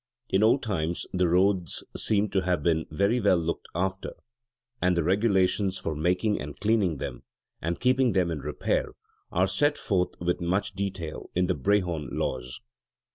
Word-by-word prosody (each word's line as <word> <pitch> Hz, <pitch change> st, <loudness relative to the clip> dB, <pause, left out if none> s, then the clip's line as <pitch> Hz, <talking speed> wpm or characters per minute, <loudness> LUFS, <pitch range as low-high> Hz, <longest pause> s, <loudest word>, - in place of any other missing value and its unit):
In 95 Hz, -, +2 dB
old 115 Hz, +5 st, +4 dB
times 85 Hz, -6 st, -2 dB
the 90 Hz, -1 st, +2 dB
roads 90 Hz, 0 st, +1 dB
seem 105 Hz, -1 st, +1 dB
to 95 Hz, 0 st, +1 dB
have 90 Hz, -4 st, 0 dB
been 80 Hz, -1 st, +1 dB
very 100 Hz, +9 st, +1 dB
well 100 Hz, -5 st, +4 dB
looked 85 Hz, 0 st, -3 dB
after: 95 Hz, +2 st, -2 dB, 0.7 s
and 90 Hz, -1 st, +2 dB
the 85 Hz, -, +2 dB
regulations 95 Hz, 0 st, +2 dB
for 80 Hz, -4 st, -3 dB
making 90 Hz, +7 st, +1 dB
and 75 Hz, -1 st, -7 dB
cleaning 105 Hz, -7 st, +2 dB
them, -, -, -5 dB, 0.4 s
and 85 Hz, +2 st, -2 dB
keeping 125 Hz, -2 st, +3 dB
them 90 Hz, -3 st, +2 dB
in 80 Hz, -, -3 dB
repair, -, -, -1 dB, 0.4 s
are 90 Hz, +2 st, +3 dB
set 145 Hz, +11 st, +1 dB
forth 90 Hz, -3 st, -1 dB
with 85 Hz, +1 st, -1 dB
much 100 Hz, +4 st, 0 dB
detail 95 Hz, -5 st, -4 dB
in 90 Hz, +1 st, +3 dB
the 90 Hz, -, +1 dB
Brehon 85 Hz, -2 st, 0 dB
Laws. 65 Hz, +9 st, -3 dB
90 Hz, 165 wpm, -27 LUFS, 85-100 Hz, 0.7 s, old